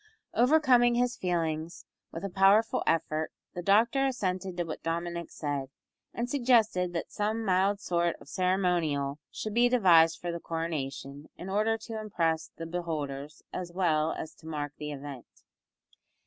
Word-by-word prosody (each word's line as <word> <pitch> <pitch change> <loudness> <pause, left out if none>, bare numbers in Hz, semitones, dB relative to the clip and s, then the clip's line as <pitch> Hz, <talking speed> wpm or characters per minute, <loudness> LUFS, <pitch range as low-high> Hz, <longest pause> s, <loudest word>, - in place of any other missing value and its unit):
Overcoming 250 -3 +5
his 245 0 +1
feelings 165 -2 -2 0.3
with 165 +4 -5
a - - -2
powerful 195 +4 +4
effort 160 -1 0 0.2
the 175 - -4
doctor 230 +8 +3
assented 185 -7 -2
to 175 - +1
what 165 -2 -6
Dominick 170 +1 -3
said, 145 -3 -3 0.4
and 235 +1 -3
suggested 230 -9 +3
that 170 - -4
some 220 +2 -1
mild 195 +1 +2
sort 170 -3 0
of - - -15
ceremonial 170 -5 0
should 215 - -5
be 240 +2 +4
devised 170 -9 +5
for 175 - -3
the 170 - -4
coronation, 150 -4 -4
in 185 - -7
order 215 +3 +1
to 225 0 -6
impress 165 -6 -1
the 165 - -5
beholders 150 -4 -4
as 180 -1 -4
well 160 -4 +1
as 160 - -6
to 160 - -15
mark 145 -2 -4
the 150 0 -4
event. 140 -3 -8
175 Hz, 150 wpm, -29 LUFS, 160-210 Hz, 0.4 s, Overcoming